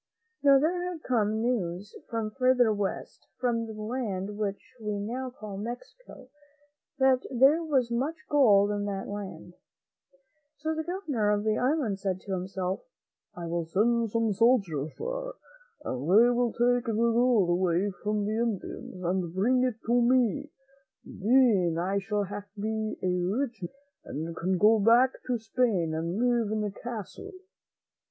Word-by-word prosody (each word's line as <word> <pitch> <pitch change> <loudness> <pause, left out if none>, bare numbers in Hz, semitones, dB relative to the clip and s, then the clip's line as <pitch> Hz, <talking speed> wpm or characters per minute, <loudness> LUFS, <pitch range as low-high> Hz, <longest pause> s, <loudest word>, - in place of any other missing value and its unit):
Now, 280 -1 +6
there 335 +6 +1
had 325 -3 -9
come 220 -3 0
news 205 -5 -2
from 225 -2 -2
further 250 -2 +3
west, 200 -2 -4
from 230 -2 0
the 220 - -7
land 210 -4 -3
which 205 -1 -4
we 210 -1 -2
now 245 +6 -4
call 215 -5 -8
Mexico, 250 - -9 0.7
that 265 -1 +3
there 275 +6 +4
was 265 -7 +1
much 270 +7 -1
gold 210 -8 +5
in 205 0 -2
that 195 -1 -4
land. 190 -4 -7 1.0
So 315 +1 -2
the 315 0 -3
Governor 310 - -1
of 205 0 +1
the 215 0 +1
island 250 -7 0
said 190 -2 -2
to 200 - -8
himself, 185 0 -3 0.5
"I 175 - -6
will 170 0 -2
send 230 +6 +1
some 225 0 +1
soldiers 195 - +2
there, - - -4 0.5
and 125 - -3
they 225 +6 +6
will 245 0 +1
take 245 0 +1
the 225 - 0
gold 230 -3 +3
away 180 +2 +1
from 210 -1 -1
the 215 +2 -1
Indians 205 -4 -4
and 175 -1 -1
bring 250 +6 +2
it 250 -3 0
to 240 +1 +3
me; 255 +4 +2 0.6
then 210 -7 +3
I 190 +4 0
shall 205 +1 -1 0.3
be 220 +1 -2
a 180 -1 +1
rich 245 -5 -2
man, 175 - -4 0.6
and 165 - -7
can 185 +3 0
go 215 +4 +5
back 235 +5 +5 0.2
to 250 -1 +1
Spain 220 -7 0
and 165 +3 -2
live 240 -2 +1
in 215 -1 -1
a 205 - -2
castle." 240 - -7
220 Hz, 155 wpm, -28 LUFS, 195-250 Hz, 1.0 s, Now